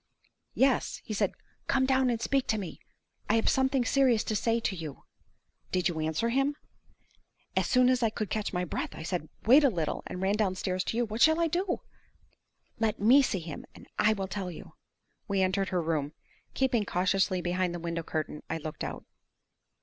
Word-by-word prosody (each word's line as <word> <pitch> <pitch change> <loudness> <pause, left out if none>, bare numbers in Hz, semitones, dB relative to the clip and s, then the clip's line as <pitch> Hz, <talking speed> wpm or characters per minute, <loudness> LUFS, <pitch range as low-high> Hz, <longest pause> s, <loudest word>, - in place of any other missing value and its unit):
"Yes. 265 -1 +2
He 220 - -4
said, 205 - 0 0.3
'Come 260 - +3
down 260 -1 +3
and 235 -2 0
speak 270 +3 0
to 220 - +1
me! 190 -5 -6 0.5
I 215 - +4
have 225 - +1
something 265 -1 +2
serious 250 -5 +3
to 220 - -2
say 230 +3 +1
to 205 -4 -2
you!'" 160 -5 -7 0.7
"Did 180 -1 +1
you 165 -2 -4
answer 160 +8 0
him?" 275 +4 +1 1.0
"As - - +2
soon 250 -1 +4
as 255 0 +3
I 225 - +3
could 215 -2 -4
catch 215 -1 -1
my 180 -1 -1
breath, - - -4
I - - -7
said, 165 -2 -3 0.2
'Wait 265 +7 +7
a 280 - +6
little,' 165 -8 -2
and 180 - -6
ran 190 +2 +1
downstairs 185 -3 0
to 225 - -2
you. 240 - +2
What 220 +2 -5
shall 315 +1 +6
I 335 - +3
do?" 360 +3 -1 1.0
"Let 220 -2 0
me 245 +7 +7
see 195 -9 -1
him, 160 -2 -7
and - - -13
I 215 +1 +5
will 195 -2 -3
tell 190 -1 -4
you." 170 - -10 0.5
We 195 -2 +1
entered 190 +1 0
her 180 -2 0
room. 155 -2 -1 0.4
Keeping 255 -5 +2
cautiously 185 0 +1
behind 180 0 -1
the - - -4
window 170 0 -3
curtain, 155 -2 -4
I - - -1
looked 155 -1 -6
out. - - -5
205 Hz, 195 wpm, -29 LUFS, 180-250 Hz, 1.0 s, Wait